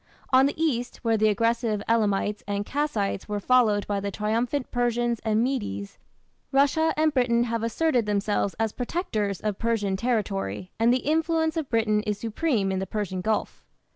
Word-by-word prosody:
On 260 Hz, +1 st, +6 dB
the 290 Hz, -, -5 dB
east, 250 Hz, -7 st, -1 dB
where 225 Hz, -1 st, +2 dB
the 215 Hz, 0 st, +3 dB
aggressive 230 Hz, 0 st, 0 dB
Elamites 210 Hz, -2 st, +1 dB
and 205 Hz, 0 st, -2 dB
Kassites 225 Hz, -9 st, -2 dB
were 205 Hz, 0 st, -1 dB
followed 215 Hz, -3 st, +3 dB
by 205 Hz, -1 st, -1 dB
the 200 Hz, 0 st, -3 dB
triumphant 230 Hz, +7 st, -1 dB
Persians 240 Hz, -1 st, 0 dB
and 220 Hz, 0 st, +2 dB
Medes, 205 Hz, -, -3 dB, 0.5 s
Russia 285 Hz, +4 st, +3 dB
and 310 Hz, -1 st, +2 dB
Britain 240 Hz, -3 st, +2 dB
have 230 Hz, -1 st, -2 dB
asserted 240 Hz, 0 st, +1 dB
themselves 205 Hz, -1 st, 0 dB
as 225 Hz, -1 st, +1 dB
protectors 220 Hz, -, -2 dB
of 210 Hz, -2 st, -2 dB
Persian 220 Hz, -4 st, 0 dB
territory, 195 Hz, -, -2 dB
and 230 Hz, +1 st, +4 dB
the 255 Hz, 0 st, 0 dB
influence 320 Hz, +1 st, +1 dB
of 315 Hz, -4 st, -3 dB
Britain 220 Hz, -2 st, +2 dB
is 210 Hz, -1 st, -2 dB
supreme 225 Hz, -2 st, 0 dB
in 190 Hz, -, -1 dB
the 190 Hz, -, -3 dB
Persian 190 Hz, -3 st, -3 dB
Gulf. 215 Hz, +2 st, -2 dB
225 Hz, 170 wpm, -26 LUFS, 205-255 Hz, 0.5 s, On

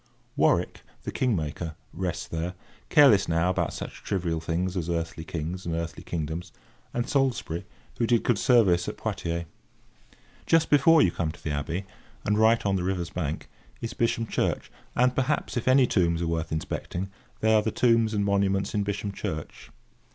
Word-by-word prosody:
Warwick, -, -, +2 dB, 0.2 s
the -, -, -4 dB
king 125 Hz, -4 st, +1 dB
maker, 80 Hz, 0 st, -4 dB, 0.2 s
rests 85 Hz, -1 st, -3 dB
there, 85 Hz, +2 st, -3 dB, 0.3 s
careless 110 Hz, -10 st, +6 dB
now 85 Hz, +2 st, +2 dB
about -, -, 0 dB
such -, -, -7 dB
trivial 85 Hz, -4 st, -1 dB
things 90 Hz, +3 st, -1 dB
as 85 Hz, -2 st, -2 dB
earthly 85 Hz, -1 st, -2 dB
kings 85 Hz, +3 st, -4 dB
and 85 Hz, -1 st, -2 dB
earthly 85 Hz, 0 st, -4 dB
kingdoms; 85 Hz, +2 st, -4 dB, 0.4 s
and 120 Hz, +1 st, -2 dB
Salisbury, 130 Hz, -, 0 dB, 0.3 s
who 115 Hz, -, +2 dB
did 120 Hz, -1 st, +3 dB
good 120 Hz, -5 st, +2 dB
service 105 Hz, -10 st, +4 dB
at -, -, -7 dB
Poitiers. 85 Hz, 0 st, -3 dB, 1.0 s
Just 165 Hz, -1 st, +3 dB
before 150 Hz, +2 st, +6 dB
you 90 Hz, -, +3 dB
come 80 Hz, -2 st, -2 dB
to 85 Hz, -, -16 dB
the 80 Hz, -, -2 dB
abbey, 80 Hz, +6 st, -2 dB, 0.4 s
and 105 Hz, +1 st, +2 dB
right 110 Hz, +1 st, +4 dB
on 100 Hz, -1 st, +2 dB
the 90 Hz, -, -2 dB
river's 90 Hz, -2 st, -2 dB
bank, 80 Hz, -5 st, -3 dB, 0.3 s
is 115 Hz, +1 st, -4 dB
Bisham 115 Hz, -1 st, 0 dB
Church, -, -, -1 dB, 0.2 s
and, 125 Hz, +1 st, +3 dB
perhaps, 135 Hz, +3 st, 0 dB
if 120 Hz, -, -2 dB
any 130 Hz, 0 st, +6 dB
tombs 85 Hz, -6 st, +1 dB
are -, -, -1 dB
worth 80 Hz, -1 st, -2 dB
inspecting, 85 Hz, +4 st, -3 dB, 0.3 s
they 110 Hz, 0 st, +4 dB
are 110 Hz, -, +5 dB
the 110 Hz, -, -1 dB
tombs 115 Hz, -1 st, +3 dB
and 100 Hz, -1 st, +1 dB
monuments 100 Hz, -1 st, +1 dB
in 105 Hz, -, +1 dB
Bisham 100 Hz, 0 st, -2 dB
Church. 80 Hz, -5 st, -6 dB
95 Hz, 175 wpm, -27 LUFS, 85-115 Hz, 1.0 s, careless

